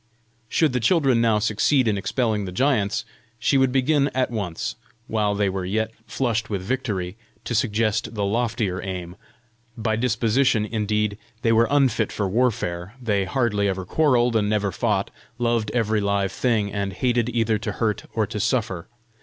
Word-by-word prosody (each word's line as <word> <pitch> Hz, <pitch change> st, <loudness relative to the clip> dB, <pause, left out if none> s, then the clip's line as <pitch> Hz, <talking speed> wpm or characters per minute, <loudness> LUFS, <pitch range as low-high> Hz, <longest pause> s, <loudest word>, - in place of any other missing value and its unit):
Should 155 Hz, -5 st, +2 dB
the 125 Hz, -, +1 dB
children 135 Hz, -2 st, +3 dB
now 115 Hz, -2 st, +3 dB
succeed 115 Hz, +5 st, +2 dB
in 105 Hz, -, +2 dB
expelling 105 Hz, 0 st, -1 dB
the 90 Hz, -, -5 dB
giants, 110 Hz, -1 st, +1 dB, 0.3 s
she 115 Hz, -, +1 dB
would 130 Hz, -1 st, +4 dB
begin 140 Hz, +2 st, +2 dB
at 130 Hz, -2 st, +1 dB
once, 100 Hz, -8 st, -3 dB, 0.3 s
while 105 Hz, -3 st, 0 dB
they 100 Hz, 0 st, +1 dB
were 95 Hz, -1 st, -2 dB
yet 110 Hz, +4 st, -1 dB, 0.2 s
flushed 115 Hz, -2 st, -1 dB
with 100 Hz, -3 st, -2 dB
victory, 105 Hz, -5 st, -2 dB, 0.3 s
to -, -, -4 dB
suggest 110 Hz, 0 st, 0 dB
the 100 Hz, -1 st, 0 dB
loftier 110 Hz, -3 st, -1 dB
aim! 90 Hz, -2 st, -5 dB, 0.6 s
By 110 Hz, -1 st, 0 dB
disposition, 115 Hz, 0 st, +2 dB
indeed, 105 Hz, -1 st, -1 dB, 0.2 s
they 115 Hz, -, +3 dB
were 115 Hz, +1 st, +4 dB
unfit 135 Hz, -4 st, +2 dB
for 100 Hz, -, -1 dB
warfare; 105 Hz, -4 st, -1 dB
they 105 Hz, -5 st, 0 dB
hardly 105 Hz, -1 st, +1 dB
ever 95 Hz, -1 st, -2 dB
quarrelled, 125 Hz, -, +2 dB
and 105 Hz, -2 st, +2 dB
never 105 Hz, -2 st, +1 dB
fought; 100 Hz, +2 st, 0 dB, 0.3 s
loved 115 Hz, -3 st, 0 dB
every 110 Hz, -2 st, +1 dB
live 100 Hz, -1 st, 0 dB
thing, 110 Hz, -5 st, 0 dB
and 100 Hz, -2 st, -2 dB
hated 120 Hz, +2 st, +1 dB
either 115 Hz, -2 st, +1 dB
to 105 Hz, -, -3 dB
hurt 105 Hz, -3 st, -1 dB
or 110 Hz, -2 st, 0 dB
to 105 Hz, -, -5 dB
suffer. 105 Hz, -5 st, -1 dB
110 Hz, 165 wpm, -23 LUFS, 100-120 Hz, 0.6 s, would